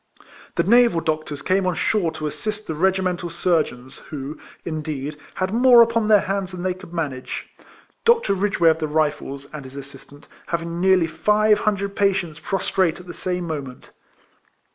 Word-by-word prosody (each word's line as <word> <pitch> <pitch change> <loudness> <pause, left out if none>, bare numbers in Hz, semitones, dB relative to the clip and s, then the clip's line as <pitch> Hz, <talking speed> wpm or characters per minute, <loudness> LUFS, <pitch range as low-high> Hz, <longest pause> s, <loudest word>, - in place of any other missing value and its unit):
The - - +2
naval 235 -4 +5
doctors 155 -2 -3
came 185 0 +1
on 180 - 0
shore 180 -2 +1
to 155 - -5
assist 215 +8 -4
the 160 - -3
regimental 180 +1 0
surgeons, 155 -7 -1
who, 145 0 -7 0.3
in 155 -2 -3
deed, 150 -1 -4 0.2
had 185 +1 -2
more 240 0 +7
upon 230 -1 0
their 210 -2 +6
hands 195 -1 -2
than 180 -1 -6
they 185 -1 0
could 185 -1 -13
manage; 145 -7 -4 0.5
Dr. 465 - +4
Ridgeway 190 -3 +2
of 160 0 +2
the 155 - -1
Rifles, 150 -2 -1
and 150 -2 -6
his 130 +1 -11
assistant, 140 +1 -12 0.2
having 170 0 -3
nearly 190 -2 +4
five 210 +6 +2
hundred 200 -1 -1
patients 190 -6 0
prostrate 190 -2 0
at 180 - -12
the 175 - -8
same 180 -1 -3
moment. 140 -6 -6
175 Hz, 165 wpm, -22 LUFS, 155-195 Hz, 0.5 s, more